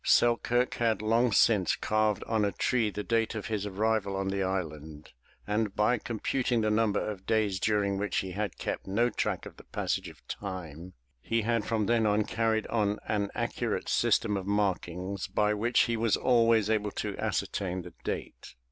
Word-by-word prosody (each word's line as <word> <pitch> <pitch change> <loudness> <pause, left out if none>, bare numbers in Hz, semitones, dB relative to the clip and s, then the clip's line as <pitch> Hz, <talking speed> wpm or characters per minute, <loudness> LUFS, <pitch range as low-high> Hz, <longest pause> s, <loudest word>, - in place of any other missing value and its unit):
Selkirk 120 +1 +3
had 115 -3 +1
long 115 +2 +3
since 100 -3 +4
carved 110 -1 0
on 110 -2 0
a 100 - +1
tree 115 -1 +1
the 105 0 -5
date 115 0 0
of 110 - -4
his 105 -1 -1
arrival 105 0 0
on 95 0 -1
the 100 0 -1
island, 80 -5 -4 0.3
and 105 -1 -1
by 110 +3 +2
computing 120 +2 -1
the 110 0 +1
number 105 -1 +2
of 100 -3 -6
days 105 -4 +1
during 100 -2 +1
which 105 -1 -1
he 95 - -1
had 100 -1 -3
kept - - -4
no 115 +5 +2
track - - -2
of - - -11
the - - -13
passage - - -2
of - - -18
time, 90 -3 -6 0.3
he 115 - 0
had 115 0 +1
from 110 -2 0
then 115 0 +2
on 105 +1 +3
carried 110 0 0
on 105 -2 0
an 100 -2 0
accurate - - -2
system 105 -2 +2
of 95 0 -5
markings 95 -2 -1
by 105 0 +1
which 115 +4 +2
he 120 - +1
was 115 -1 +2
always 115 -4 +3
able 105 -1 +1
to - - -4
ascertain 95 -2 -2
the 90 - -11
date. - - -5
105 Hz, 185 wpm, -29 LUFS, 95-115 Hz, 0.3 s, since